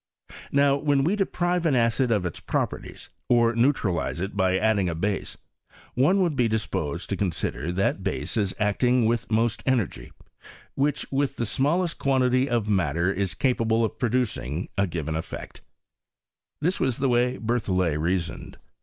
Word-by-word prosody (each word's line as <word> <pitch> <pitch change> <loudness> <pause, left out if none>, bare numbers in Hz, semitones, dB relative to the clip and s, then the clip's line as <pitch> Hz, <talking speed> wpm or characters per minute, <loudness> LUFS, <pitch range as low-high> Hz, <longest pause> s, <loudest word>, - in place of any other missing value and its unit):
Now 140 0 +4
when 145 -1 +2
we 175 +8 +2
deprive 180 -3 0
an 145 - +2
acid 120 +2 +2
of 105 -5 +1
its 85 - -4
]m)perties, - - -4 0.2
or 120 -1 +4
neutralize 95 - +1
it 95 +3 -4
by 95 -1 +2
adding 100 -3 +2
a 85 - -3
base, 100 +4 -2 0.6
one 145 +10 +3
vould 175 -6 +1
be 125 -3 +2
disposed 90 -7 -2
to - - +1
consider 85 -3 -2
that 95 +1 0
base 75 -7 -3
as 100 -4 0
acting 120 +4 +2
'vrith 115 +1 0
most 115 +1 +1
energy, 110 - -1 0.6
which 145 +1 0
with 140 0 0
the 120 - -2
smallest 155 - 0
quantity 130 -1 +2
of 120 -3 0
matter 90 -2 +1
is 95 -2 -2
capable 115 -3 +1
of - - -6
producing 110 - -1
a 100 0 +1
given 80 -2 -3
eff*ect« 80 - -6 1.0
This 175 +5 0
was 130 -3 0
the 140 - +1
way 125 0 +2
that 115 - -9
BerthoUet 95 -9 0
reasoned. 85 0 -2
115 Hz, 160 wpm, -25 LUFS, 95-130 Hz, 1.0 s, Now